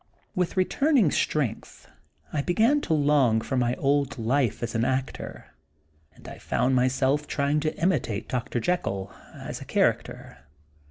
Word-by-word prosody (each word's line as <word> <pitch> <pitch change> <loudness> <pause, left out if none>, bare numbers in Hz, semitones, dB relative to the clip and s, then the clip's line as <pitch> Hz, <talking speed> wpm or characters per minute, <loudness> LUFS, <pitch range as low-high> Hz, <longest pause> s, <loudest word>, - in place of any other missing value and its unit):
With 180 0 -1
returning 240 - +3
strength 130 -8 -2 0.5
I 150 - 0
began 225 - +2
to 165 - -1
long 140 -6 +3
for 130 - -4
my 120 -1 +1
old 140 -1 0
life 120 0 0
as 120 - -3
an 115 - 0
actor, 130 +2 -3 0.6
and - - -15
I - - -9
found 130 +1 0
myself 130 +3 +1
trying 140 +1 0
to 155 +1 -2
imitate 115 - 0
Dr. 125 -1 -2
Jekyll, 100 - -2 0.2
as - - -7
a - - -8
character. - - -1
140 Hz, 145 wpm, -26 LUFS, 120-155 Hz, 0.6 s, returning